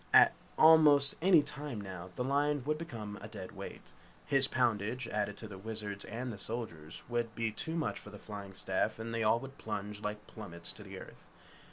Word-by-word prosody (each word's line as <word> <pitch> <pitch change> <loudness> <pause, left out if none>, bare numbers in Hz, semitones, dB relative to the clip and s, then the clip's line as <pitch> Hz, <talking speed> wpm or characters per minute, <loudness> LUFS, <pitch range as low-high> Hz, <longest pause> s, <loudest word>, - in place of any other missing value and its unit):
At - - +9 0.2
almost 150 -3 +8
any 175 -4 +6
time 145 -6 -5
now, 95 -3 -7
the 125 - -1
lion 145 +1 +1
would 155 +1 0
become 110 -10 -6
a 105 - -6
dead 100 -4 -8
weight. - - -9 0.3
His 135 -1 +4
poundage 120 -1 0
added 105 -2 -1
to 110 - -7
the 100 -2 -9
Wizard's 105 -1 -5
and 120 +2 -4
the 100 - -9
Soldier's 100 -9 -5
would 120 -1 -1
be 115 -1 0
too 160 +9 -2
much 165 - -1
for - - -11
the 105 - -10
flying 100 -2 -8
staff 95 +3 0
and 115 +1 -5
they 115 - 0
all 110 +1 +4
would 135 +1 -10
plunge 105 -1 -4
like 105 0 -4
plummets 85 -6 -5
to - - -12
the - - -8
earth. - - -11
110 Hz, 200 wpm, -33 LUFS, 105-135 Hz, 0.3 s, At